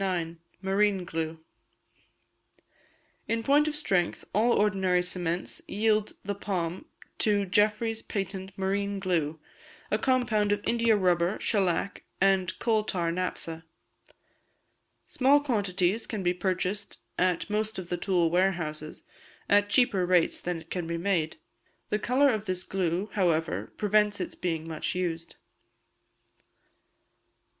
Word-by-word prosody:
Marine 195 0 +2
Glue. 160 -1 -4 1.9
In 230 0 -1
point 290 +4 +4
of 305 - -2
strength, 185 - 0
all 230 +4 +3
ordinary 190 -3 +2
cements 175 -1 -2
yield 215 0 +1
the 200 - -1
palm 185 -3 -3 0.3
to 205 -2 +3
Jeffery's 215 +3 +2
Patent 195 -1 -4
Marine 200 +1 -1
Glue, 165 -5 -1 0.5
a - - +2
compound 235 -6 +2
of 205 0 -1
India 230 -1 +3
rubber, 180 -1 +2
shellac, 195 -2 0 0.2
and 195 -2 +2
coal 220 -2 +1
tar 175 -5 -1
naphtha. 165 -2 -4 1.4
Small 275 +2 +4
quantities 205 -6 0
can 210 -4 -4
be 175 0 +2
purchased 185 +2 -2 0.2
at 180 -2 +1
most 215 +1 -1
of 180 -2 -6
the 175 - -1
tool 175 -3 +1
warehouses, 170 -4 -1 0.4
at 205 0 +4
cheaper 210 -5 +3
rates 180 -2 +2
than 175 -1 -3
it 160 0 -17
can 175 -3 -3
be 170 0 -2
made. 170 - 0 0.5
The 210 - 0
colour 260 +6 +3
of 215 -1 -3
this 185 -1 -1
glue, 185 +2 -1
however, 165 -5 0
prevents 210 0 +2
its - - -3
being 165 -2 -3
much 160 +1 -3
used. 170 -2 -3
190 Hz, 125 wpm, -28 LUFS, 175-210 Hz, 1.9 s, point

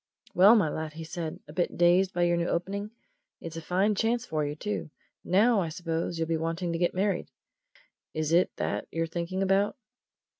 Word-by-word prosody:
"Well, 200 +5 +7
my 205 -8 +3
lad," 155 +1 -4
he 160 +1 -7
said; 160 0 -5
"a 150 - -11
bit 175 +1 -1
dazed 180 +2 +4
by 175 -3 0
your 175 0 +3
new 170 0 0
opening? 200 +4 -2 0.5
It's 165 -1 -8
a 165 - -5
fine 190 +5 +1
chance 230 +4 0
for 155 -8 -1
you, 145 0 -3
too! 210 +1 -4 0.3
Now, 210 +4 +4
I 165 - -2
suppose, 165 0 -3
you'll 165 0 -1
be 165 0 0
wanting 165 +2 -2
to 165 - -2
get 175 0 +1
married. 190 -1 0 0.9
Is 155 0 -1
it 175 +2 +4
that - - -2
you're 165 0 -1
thinking 175 +3 -3
about?" 195 +4 +2
175 Hz, 195 wpm, -28 LUFS, 165-195 Hz, 0.9 s, Well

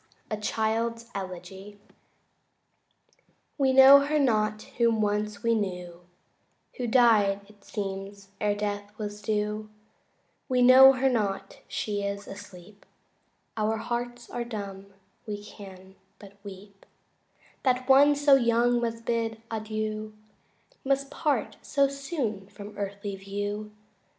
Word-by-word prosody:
A 215 - -1
Child's 230 +2 -2
Elegy 190 +2 -8 1.8
We 270 -1 +3
know 265 +1 +9
her 290 +2 0
not 215 -6 +1 0.2
whom 230 -2 +3
once 210 0 -1
we 230 0 +3
knew, 180 -5 -3 0.8
Who 245 - -2
died 220 -5 +4
it 205 -1 -21
seems 195 -1 -6
e'er 205 -1 +1
death 205 0 -4
was 210 -1 -6
due 210 0 -2 0.8
We 250 -1 +3
know 260 +2 +9
her 265 +1 +1
not; 200 -6 -1
she 205 -1 -3
is 200 0 -4
asleep; 195 0 -12 0.7
Our 220 0 0
hearts 240 +1 -4
are 240 - -3
dumb 200 -4 -7 0.4
we 205 -1 -5
can 190 -2 -12 0.2
but 200 -1 -14
weep 200 0 -12 0.7
That 255 -1 +1
one 280 +2 +6
so 285 0 +4
young 240 -1 +3
must 230 -1 -3
bid 230 -1 -1
adieu, 215 -1 -4 0.7
Must 275 0 0
part 300 -3 -1
so 280 -1 +2
soon 275 - -4
from 205 +1 -11
earthly 200 0 -5
view. 205 +2 -4
215 Hz, 120 wpm, -27 LUFS, 200-240 Hz, 1.8 s, know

